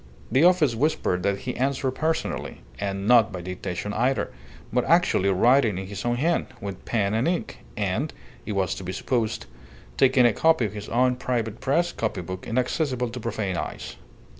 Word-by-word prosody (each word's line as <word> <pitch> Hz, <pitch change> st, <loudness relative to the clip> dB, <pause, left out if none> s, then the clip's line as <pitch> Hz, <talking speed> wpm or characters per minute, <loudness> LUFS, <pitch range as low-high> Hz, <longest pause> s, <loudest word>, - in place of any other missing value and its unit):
The 135 Hz, +4 st, +4 dB
office 175 Hz, -7 st, +5 dB
whispered 115 Hz, -, 0 dB
that 100 Hz, +1 st, 0 dB
he 125 Hz, -, -4 dB
answered 135 Hz, 0 st, 0 dB
personally 160 Hz, +4 st, -2 dB, 0.2 s
and 100 Hz, 0 st, -3 dB
not 115 Hz, -3 st, +6 dB
by 90 Hz, -2 st, -5 dB
dictation 90 Hz, +2 st, -4 dB
either, 125 Hz, +5 st, 0 dB, 0.4 s
but 125 Hz, 0 st, +2 dB
actually 170 Hz, -, +3 dB
writing 115 Hz, +2 st, +4 dB
in 95 Hz, -, -4 dB
his 100 Hz, +1 st, -6 dB
own 120 Hz, 0 st, +1 dB
hand, 165 Hz, +7 st, +1 dB
with 100 Hz, -2 st, -6 dB
pen 105 Hz, -3 st, 0 dB
and 115 Hz, +7 st, +1 dB
ink, 175 Hz, 0 st, -2 dB, 0.2 s
and, 105 Hz, +9 st, -1 dB, 0.3 s
it 105 Hz, -, -4 dB
was 95 Hz, -3 st, 0 dB
to -, -, -7 dB
be 95 Hz, +1 st, -4 dB
supposed, 115 Hz, +2 st, -1 dB, 0.5 s
taking 130 Hz, -1 st, +5 dB
a 120 Hz, -, +5 dB
copy 160 Hz, -1 st, +3 dB
in 105 Hz, -, -3 dB
his 105 Hz, 0 st, -7 dB
own 125 Hz, +1 st, +2 dB
private 115 Hz, -4 st, -2 dB
press 170 Hz, +6 st, +1 dB
copy 110 Hz, -4 st, -2 dB
book, 95 Hz, +1 st, -7 dB
inaccessible 125 Hz, +1 st, 0 dB
to 125 Hz, -, -6 dB
profane 105 Hz, -5 st, -2 dB
eyes. -, -, -5 dB
115 Hz, 180 wpm, -25 LUFS, 100-130 Hz, 0.5 s, not